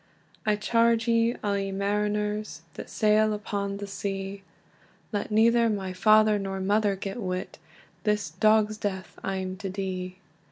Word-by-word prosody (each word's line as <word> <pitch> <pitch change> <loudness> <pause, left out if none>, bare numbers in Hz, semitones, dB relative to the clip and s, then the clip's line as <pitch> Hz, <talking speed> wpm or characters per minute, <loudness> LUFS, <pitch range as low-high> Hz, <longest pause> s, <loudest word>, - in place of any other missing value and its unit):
"I 210 - +4
charge 230 +2 +2
ye 230 +1 +3
all, 205 -1 +1
ye 195 0 -2
mariners, 210 -2 -1
That - - -8
sail 215 0 +3
upon 200 -1 -3
the 205 - -5
sea, 195 0 -4 0.7
Let 205 -2 -2
neither 230 +2 +4
my 195 -3 -2
father 215 +2 +5
nor 195 -1 -3
mother 205 +1 +2
get 195 +4 -5
wit, 185 -2 -4 0.4
This 210 -6 0
dog's 215 +4 +3
death 190 -3 -4
I'm 190 -1 -3
to 195 0 -5
die. 185 -1 -4
205 Hz, 145 wpm, -27 LUFS, 195-215 Hz, 0.7 s, father